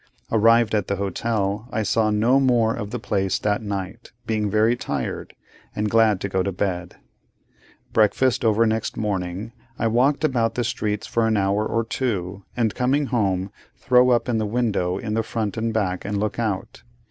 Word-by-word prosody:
Arrived 115 0 +4
at 105 -4 +1
the 100 - 0
hotel; 100 +2 -2
I 110 -1 -1
saw 110 +2 +2
no 115 +6 +3
more 120 -4 +3
of 105 -3 -5
the 120 - -3
place 95 -4 -1
that 105 0 0
night; 100 +2 -5
being 110 -2 -1
very 110 +3 +3
tired, 70 - -4 0.4
and 105 0 -1
glad 110 -4 +4
to - - -1
get 95 -1 -1
to 100 - -1
bed. 90 -2 -3 1.0
Breakfast 120 +4 +2
over 110 0 +3
next 110 0 -1
morning, 100 0 -3 0.3
I 115 - -1
walk 130 +7 +2
about 115 -6 +1
the 120 - 0
streets 105 -2 -2
for 115 -1 0
an 110 -1 +2
hour 100 +1 +1
or 115 +1 0
two, 100 -6 -3
and, 115 -3 +1
coming 135 +4 +1
home, 95 -4 0 0.3
throw 125 0 +4
up 120 -1 +3
the 115 -3 0
window 105 -5 0
in 105 0 -4
the 115 - +1
front 110 -2 -3
and 115 0 -1
back, 95 -5 -1
and 100 0 -2
look 105 +2 -2
out. 105 -5 -3
110 Hz, 180 wpm, -23 LUFS, 100-115 Hz, 1.0 s, Arrived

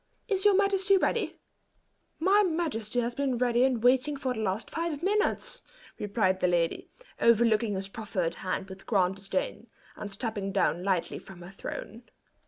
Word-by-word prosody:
Is 395 -2 0
your 410 -2 +6
majesty 395 0 +4
ready?" - - 0 0.8
"My 385 +5 +5
majesty 310 - -1
has 235 +1 -2
been 270 -1 -1
ready 245 0 +3
and 255 -4 +1
waiting 265 +4 +3
for 260 -2 -1
the 225 - -6
last 205 0 -2
five 330 -2 -3
minutes," 420 +3 0 0.4
replied 200 -3 +1
the 180 - +2
lady, 170 -2 0 0.3
over 235 0 +5
looking 220 -2 +2
his 190 0 -3
proffered 195 -5 -3
hand 190 0 -2
with 190 0 -11
grand 190 -3 +2
disdain, 195 +4 -3 0.3
and 205 - -7
stepping 200 -1 -3
lightly 185 -2 0
down - - -20
from 190 -2 -11
her 175 - -9
throne. 215 +3 -7
230 Hz, 165 wpm, -29 LUFS, 195-295 Hz, 0.8 s, your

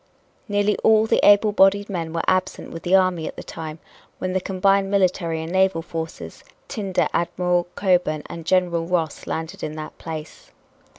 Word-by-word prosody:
Nearly 205 0 +1
all 220 0 +4
the - - +1
able 205 +1 +6
bodied 200 0 +4
men 170 -5 -4
were 165 0 -2
absent 185 0 -1
with 165 - -7
the 180 +2 +2
army 185 -4 +2
at - - -7
the - - -8
time 155 -1 -7 0.4
when 185 0 -3
the 185 - 0
combined 195 +1 +1
military 180 -4 +1
and 165 - -6
naval 190 -3 +2
forces 165 -1 -7 0.2
tinder 200 -7 -1
Admiral 175 0 0
Cockburn 180 -6 +1
and 165 - -8
General 170 -1 +1
Ross 165 -4 -2
landed 165 +5 -5
at 155 - -4
that 155 0 -7
place. 155 -2 -8
180 Hz, 170 wpm, -22 LUFS, 165-195 Hz, 0.4 s, able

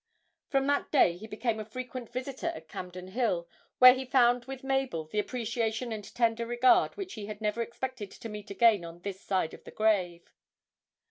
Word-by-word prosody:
From 270 -1 +2
that 285 0 0
day 215 - +5
he 215 +5 -10
became 220 +1 -2
a - - -3
frequent 250 +2 -7
visitor 255 +2 -4
at 160 0 -10
Campden 180 +2 -7
Hill, 190 -6 0 0.3
where 255 0 +10
he 260 +1 -3
found 245 -2 +3
with 270 0 -7
Mabel 270 - -1
the 210 +7 -2
appreciation 230 0 -2
and 215 -1 -4
tender 230 -1 +1
regard 240 - +4
which 385 -2 -5
he 210 -2 -7
had 210 -1 -7
never 215 +1 -1
expected 235 -2 -5
to 230 - -9
meet 210 -2 -8
again 210 -2 +4
on 170 +1 -9
this 195 0 -6
side 185 -4 -1
of - - -12
the - - -11
grave. 185 -6 0
225 Hz, 190 wpm, -30 LUFS, 200-255 Hz, 0.3 s, where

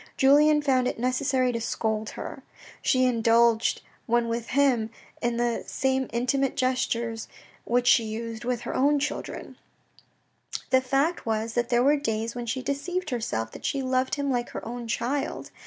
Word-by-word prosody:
Julien 295 +2 +5
found 260 -3 +2
it - - -2
necessary 255 +1 +1
to 230 -1 -3
scold 220 -1 -1
her. - - -6 0.4
She 255 0 +3
indulged 230 -1 +3 0.2
when 235 0 +2
with 230 0 -3
him 255 -5 +2 0.3
in 235 0 0
the 240 -1 0
same 265 -1 0
intimate 255 +3 0
gestures 235 -3 -1 0.4
which 245 +1 +1
she 235 -1 +5
used 225 +1 -5
with 245 -1 -1
her - - -4
own 290 +3 +3
children. 285 +1 -4 1.1
The 260 0 +5
fact 275 +4 0
was 220 0 -1
that 240 0 0
there 240 -1 +3
were 290 +3 +4
days 225 -4 -2
when 240 -1 -5
she 255 +3 -2
deceived 355 +7 -2
herself 115 - -2
that - - -11
she 275 -1 -1
loved 255 0 +1
him 285 -1 -1
like 240 -1 -1
her - - -7
own 240 0 -5
child. 245 +5 -2
245 Hz, 165 wpm, -26 LUFS, 230-270 Hz, 1.1 s, Julien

